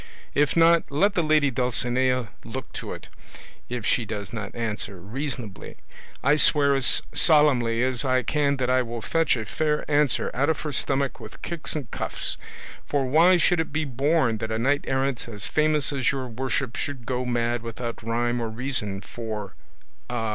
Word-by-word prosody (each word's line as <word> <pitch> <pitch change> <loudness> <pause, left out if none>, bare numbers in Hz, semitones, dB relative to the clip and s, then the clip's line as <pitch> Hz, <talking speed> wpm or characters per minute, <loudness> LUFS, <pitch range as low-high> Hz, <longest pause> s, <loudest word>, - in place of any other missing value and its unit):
If 145 +2 +2
not, 165 0 +5
let 195 +9 +2
the 180 - +2
lady 155 -3 +3
Dulcinea 125 -1 0
look - - -7
to - - -6
it; - - -8 0.6
if 120 -3 -4
she 120 - +2
does 105 -1 -6
not 105 -3 -5
answer 105 -4 -3
reasonably, 120 - -5 0.5
I 140 +3 +4
swear 140 -1 +5
as 130 -3 +3
solemnly 130 -7 +3
as 130 -1 +1
I 130 -1 +2
can 140 0 +1
that 130 -2 -1
I 130 0 +4
will 120 -2 -5
fetch 165 -5 +2
a 110 - -4
fair 150 +6 -1
answer 150 -2 +1
out 140 +5 +1
of 160 - 0
her 150 - -3
stomach 135 0 0
with - - -11
kicks 170 -2 -3
and 140 -6 -5
cuffs; - - -2 0.5
for 140 -2 0
why 165 +7 +5
should 175 0 +3
it 165 - -1
be 155 +1 -1
borne 135 -3 +1
that 110 - -3
a 110 - 0
knight 140 +5 +1
errant 130 -2 -1
as 105 -3 -3
famous 150 -2 +2
as 130 -3 +1
your 135 -2 -3
worship 125 +1 -2
should 135 -5 -4
go 125 0 -1
mad 120 -1 0
without 115 0 -6
rhyme 120 +1 -1
or 115 - -2
reason 110 -5 -2
for 105 0 -6 0.6
a 115 -2 -2
130 Hz, 180 wpm, -25 LUFS, 115-145 Hz, 0.6 s, not